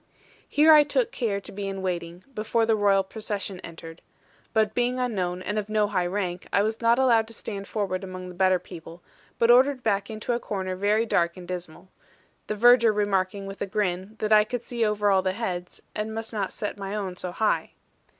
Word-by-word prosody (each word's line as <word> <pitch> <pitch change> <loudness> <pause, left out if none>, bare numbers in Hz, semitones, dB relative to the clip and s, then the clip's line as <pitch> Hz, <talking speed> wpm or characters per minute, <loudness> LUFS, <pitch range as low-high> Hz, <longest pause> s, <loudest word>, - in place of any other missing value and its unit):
Here 310 +2 +6
I 305 - +9
took 470 +10 0
care 220 - -1
to - - -9
be 200 0 -5
in 195 -1 -5
waiting, 175 -1 -4
before 225 +1 0
the 225 0 +3
Royal 200 -2 +3
procession 200 -2 -5
entered; 165 -1 -10 0.5
but 215 -1 +2
being 245 +1 0
unknown, 185 -8 -2
and 210 +1 -1
of 210 0 -6
no 215 -1 +2
high 185 -4 0
rank, 180 -1 -3
I 200 - +3
was 220 +2 -2
not 230 +1 +4
allowed 235 -4 +4
to 230 - -8
stand 200 -2 -6
forward 195 -3 -2
among 185 -1 -7
the 180 - -8
better 185 +1 +3
people, 170 -1 -11 0.3
but 230 +1 +5
ordered 255 +1 +4
back 200 -1 0
into 220 +2 -3
a 235 - 0
corner 190 -5 -3
very 210 +4 +2
dark 170 -5 +1
and 180 -1 -10
dismal; 180 -1 -7 0.6
the 215 - -2
verger 235 +1 +6
remarking, 200 -1 0
with 195 0 -8
a 200 - -1
grin, 190 0 -2
that 215 0 +1
I 210 0 +7
could 240 +2 -5
see 235 -2 -2
over 210 -1 +2
all 190 - +4
other 185 0 0
heads, 180 -5 -5
and 220 +1 -3
must 225 +1 -5
not 200 -3 -2
set 205 -1 -5
my 195 +1 -4
own 195 -3 -3
so 180 0 -5
high. 215 +3 0
205 Hz, 210 wpm, -26 LUFS, 185-225 Hz, 0.6 s, I